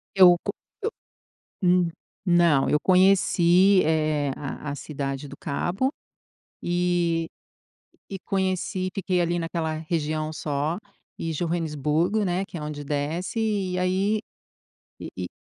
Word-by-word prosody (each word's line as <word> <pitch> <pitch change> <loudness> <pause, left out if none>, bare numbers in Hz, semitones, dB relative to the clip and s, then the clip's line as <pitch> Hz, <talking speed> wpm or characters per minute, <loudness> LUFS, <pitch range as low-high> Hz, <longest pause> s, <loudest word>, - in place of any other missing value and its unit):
Eu 180 -2 +8
co - - -1 1.1
eu 180 - +3
n 180 -1 +3 0.3
não, 170 -6 +4
eu 150 - +4
conheci, 185 0 +5
eh, 155 -2 +1
a 145 +1 -5
a - - -4
Cidade 140 -1 -4
do 140 - -11
Cabo. 180 - -1 0.7
E 175 -2 +1 0.8
e 195 - -4
conheci 185 -1 -1
e - - -3
fiquei 185 -2 0
ali 175 0 +1
naquela 165 -1 -2
região 155 -1 -2
só. 150 +2 -2 0.4
E 165 - -2
Joanesburgo, 165 +4 0
né, 185 +1 0
que 190 - -10
é 155 - -5
onde 150 -1 -5
desce, 150 +8 -2
e 200 -4 0
aí 190 +4 +1 0.8
e - - -6
e - - -3
170 Hz, 130 wpm, -25 LUFS, 155-185 Hz, 1.1 s, Eu